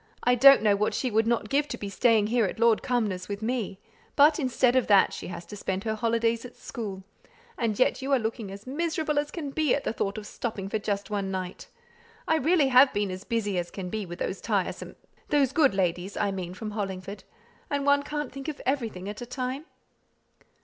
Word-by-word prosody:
I 245 - +4
don't 270 -1 +8
know 205 -2 +4
what 210 +1 0
she 255 - -1
would 220 +1 +2
not 230 -3 +1
give 290 +1 +2
to - - -5
be 205 - -5
staying 215 +2 +3
here 230 +1 +2
at 190 - -4
Lord 230 -1 +4
Cumnor's 205 -7 -1
with 200 +1 -4
me; 225 -5 -2 0.4
but, 295 +3 +6
instead 255 -2 +2
of 255 - +2
that, 200 -2 +5
she - - -6
has 175 -1 -7
to 210 - -9
spend 190 -1 -3
her 220 - -1
holidays 230 +1 0
at 250 -1 -10
school; 200 -5 -6 0.5
and 225 -3 -1
yet 255 - +2
you 270 +1 -3
are 275 - +5
looking 220 -2 -3
as 200 +2 -10
miserable 310 +1 -1
as 295 0 -2
can 295 -5 -5
be 305 -1 +2
at 285 - -4
the - - -2
thought 200 -2 -2
of 215 - -6
stopping 205 -4 -5
for 220 - -1
just 205 0 -3
one 200 -2 -1
night. 185 -1 -5 0.6
I 320 - +3
really 310 -2 +3
have 260 +2 +7
been 205 -2 0
as 185 +1 -6
busy 205 -5 -1
as 175 0 -4
can 180 -2 -6
be 215 -3 -3
with 175 0 -7
those - - -3
tiresome - - -2 0.3
those 280 -3 +3
good 280 -8 +3
ladies, 180 +1 -1
I 200 - +1
mean, 185 -2 -5
from 215 +2 -6
Hollingford 195 -1 -5 0.5
and 285 -1 -1
one 285 0 +4
can't 295 -1 -4
think 275 +2 -8
of 310 - -4
everything 230 -9 -2
at 210 +3 -6
a 240 - -6
time." 255 +4 -4
225 Hz, 220 wpm, -27 LUFS, 200-270 Hz, 0.6 s, don't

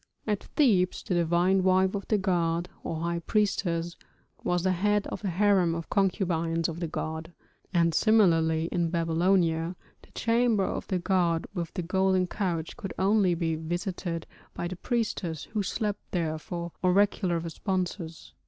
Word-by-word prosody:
At 210 -2 -1
Thebes 200 - +3
the - - -2
divine 175 +3 +3
wife 185 0 +3
of 200 -1 -4
the 215 - +2
god, 175 -3 0
or 160 -1 -3
high 170 0 -1
priestess, 175 -3 0 0.5
was 175 -1 0
the 190 - +2
head 205 +3 +1
of - - -5
the 200 - -1
harem 185 -2 +3
of 165 -1 -6
concubines 170 -4 +1
of 165 0 -5
the 170 - -2
god; 160 +1 -4 0.4
and 170 -3 +3
similarly 165 -7 +3
in 170 -2 +1
Babylonia 165 0 +1 0.3
the - - -20
chamber 230 -3 +2
of - - -4
the 185 - 0
god 175 -2 +1
with 175 -4 -3
the 180 - -2
golden 190 +1 +2
couch 175 -3 -3
could 195 - -6
only 195 -2 +3
be 165 -1 -1
visited 175 +1 -3 0.3
by 175 - -3
the 185 - -5
priestess 185 - -2
who 215 - +1
slept 205 +1 -2
there 160 -3 -1
for 170 +1 -5
oracular 185 -1 +3
responses. 170 0 -4
180 Hz, 155 wpm, -28 LUFS, 165-195 Hz, 0.5 s, Thebes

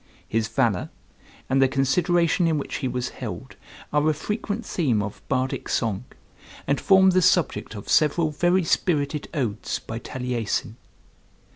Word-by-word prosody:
His 110 0 0
valor, 115 -5 0 0.6
and 135 +1 +2
the 135 - +6
consideration 170 +6 +2
in 160 -2 +1
which 140 - -4
he 135 - -2
was 125 0 -2
held, - - -7 0.4
are 150 +1 +3
a 155 - +1
frequent 210 +5 -3
theme 130 - 0
of 105 0 -7
Bardic 130 +1 -1
song, 110 -1 -1 0.6
and 140 - 0
form 190 -1 +6
the 185 0 +3
subject 165 -10 +1
of 100 - -8
several 155 +1 +3
very 175 +5 +2
spirited 150 -3 0
odes 125 -10 -2
by 115 +1 -7
Taliesin. 125 -3 -3
140 Hz, 145 wpm, -24 LUFS, 125-170 Hz, 0.6 s, the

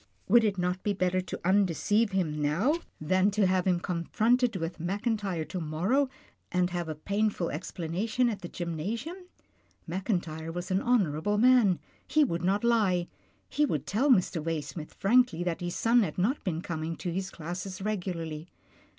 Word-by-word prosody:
Would 240 -1 +6
it 205 -3 +1
not 180 +1 -1
be 205 - 0
better 185 -1 +1
to 185 - -6
undeceive 205 +3 +2
him 160 -6 -1
now 170 - +2 0.3
than 185 +5 +2
to 205 0 +2
have 185 0 +2
him 180 -2 +3
con 175 0 -3
HIS - - -1
ONLY 170 - -7
SON - - -33
73 - - -23 0.3
fronted 225 - -14
with 170 -1 -4
Mackintyre 195 -1 -1
to 185 - -5
morrow, 185 - +1 0.4
and 180 0 +1
have 175 -2 -3
a 155 - -3
painful 200 +2 -1
explanation 185 - -1
at 220 -4 -2
the 175 - -5
gymnasium? 185 - -4 0.7
Mackin 185 +3 0
tyre 160 -1 -7
was 175 +3 -5
an 190 +1 +2
honourable 205 -5 +1
man. 235 -6 +5 0.3
He 310 - +4
would 170 -10 -1
not 195 +4 +1
lie, 200 -7 +2 0.4
he 295 - 0
would 295 - 0
tell 250 +9 +1
Mr. 180 - +3
Waysmith 160 -1 -4
frankly 215 -5 +3
that 175 0 -2
his 175 0 -3
son 235 +1 +4
had 170 -8 -2
not 220 +11 0
been 170 -3 -2
coming 165 0 -3
to 175 +2 -4
his 190 +2 -3
classes 180 +3 -6
regularly. 175 -6 -3
185 Hz, 185 wpm, -29 LUFS, 170-210 Hz, 0.7 s, Would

